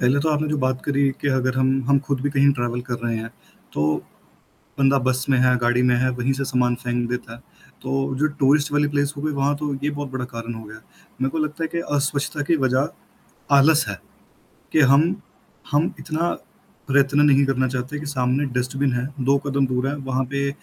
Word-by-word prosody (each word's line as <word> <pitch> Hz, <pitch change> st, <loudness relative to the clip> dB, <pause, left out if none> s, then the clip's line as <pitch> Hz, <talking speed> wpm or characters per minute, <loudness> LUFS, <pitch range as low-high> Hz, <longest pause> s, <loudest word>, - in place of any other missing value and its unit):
पहले 125 Hz, +3 st, +3 dB
तो 160 Hz, -, 0 dB
आपने 155 Hz, 0 st, 0 dB
जो 150 Hz, -, 0 dB
बात 130 Hz, -1 st, 0 dB
करी 140 Hz, -1 st, +2 dB
कि 145 Hz, -, 0 dB
अगर 130 Hz, -1 st, +1 dB
हम 130 Hz, 0 st, +3 dB, 0.2 s
हम 140 Hz, 0 st, +5 dB
खुद 140 Hz, -3 st, -1 dB
भी 145 Hz, +2 st, -1 dB
कहीं 140 Hz, 0 st, +4 dB
ट्रैवल 120 Hz, -2 st, -2 dB
कर 125 Hz, -1 st, -4 dB
रहे 115 Hz, -1 st, 0 dB
हैं, 110 Hz, 0 st, -5 dB, 0.4 s
तो 75 Hz, +1 st, +1 dB, 0.9 s
बंदा 135 Hz, 0 st, +4 dB
बस 130 Hz, 0 st, +1 dB
में 135 Hz, -, +4 dB
है, 125 Hz, 0 st, +4 dB
गाड़ी 120 Hz, 0 st, +2 dB
में 125 Hz, -1 st, +4 dB
है, 130 Hz, +1 st, +2 dB
वहीं 125 Hz, +2 st, -1 dB
से 135 Hz, +1 st, -3 dB
सामान 125 Hz, -2 st, +1 dB
फेंक 120 Hz, 0 st, -1 dB
देता 125 Hz, -2 st, -4 dB
है। 115 Hz, -, -11 dB, 0.4 s
तो 130 Hz, -, -5 dB, 0.3 s
जो 155 Hz, -, +3 dB
टूरिस्ट 145 Hz, +2 st, +3 dB
वाली 145 Hz, 0 st, +2 dB
प्लेस 145 Hz, 0 st, 0 dB
हो -, -, -5 dB
गई, 155 Hz, +1 st, -1 dB
वहाँ 140 Hz, +1 st, +1 dB
तो 145 Hz, -1 st, -3 dB
ये 145 Hz, -, +1 dB
बहुत 145 Hz, -2 st, -5 dB
बड़ा 130 Hz, -1 st, -3 dB
कारण 115 Hz, 0 st, -5 dB
हो 110 Hz, 0 st, -8 dB
गया। 110 Hz, +1 st, -11 dB, 0.4 s
मेरे 135 Hz, -, +2 dB
को 150 Hz, -, -4 dB
लगता 155 Hz, +2 st, -4 dB
है -, -, 0 dB
कि 170 Hz, -, 0 dB, 0.2 s
अस्वच्छता 145 Hz, +1 st, -1 dB
की -, -, +5 dB
वजह 130 Hz, +2 st, +2 dB, 0.7 s
आलस 150 Hz, +3 st, +5 dB
है, 100 Hz, -3 st, -4 dB, 0.7 s
कि -, -, +3 dB
हम 160 Hz, +7 st, +4 dB, 0.6 s
हम 150 Hz, +3 st, +2 dB
इतना 165 Hz, +2 st, -1 dB, 0.6 s
प्रयत्न 140 Hz, +1 st, +3 dB
नहीं 140 Hz, -1 st, +5 dB
करना 130 Hz, -1 st, +1 dB
चाहते 130 Hz, +3 st, -4 dB
कि 150 Hz, -, -7 dB
सामने 130 Hz, 0 st, 0 dB
डस्टबिन 135 Hz, +2 st, -1 dB
है, 125 Hz, +1 st, -1 dB, 0.2 s
2 135 Hz, +2 st, +3 dB
कदम 140 Hz, -1 st, +1 dB
दूर 130 Hz, +1 st, -1 dB
है, 140 Hz, -, -1 dB
वहाँ 130 Hz, -2 st, -2 dB
पे 140 Hz, 0 st, 0 dB
135 Hz, 215 wpm, -22 LUFS, 125-145 Hz, 0.9 s, हम